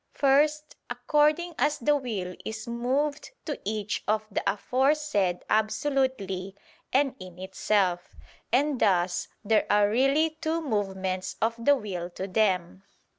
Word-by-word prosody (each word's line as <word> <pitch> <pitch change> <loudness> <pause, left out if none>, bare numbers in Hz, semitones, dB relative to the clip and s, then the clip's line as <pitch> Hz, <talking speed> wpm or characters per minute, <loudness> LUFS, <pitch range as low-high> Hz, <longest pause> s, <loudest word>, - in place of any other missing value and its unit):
First, 300 +2 +2
according 300 +7 +1
as 290 +4 +2
the 295 +5 +2
will 210 -10 -3
is 220 +1 -6
moved 260 +5 -1 0.2
to 295 - -4
each 210 0 -3
of 215 0 +1
the - - -1
aforesaid 250 -6 0
absolutely 215 -5 0 0.4
and 270 0 +2
in 185 -2 -10
itself. 190 -1 -1 0.4
And 275 +2 +2
thus 175 -2 +2 0.2
there 220 +1 +2
are 205 0 +4
really 290 +6 +2
two 325 0 0
movements 190 - -2
of 225 +1 +1
the 285 +3 +6
will 185 -8 -5
to 190 - -3
them. 185 -3 0
220 Hz, 125 wpm, -27 LUFS, 190-285 Hz, 0.4 s, the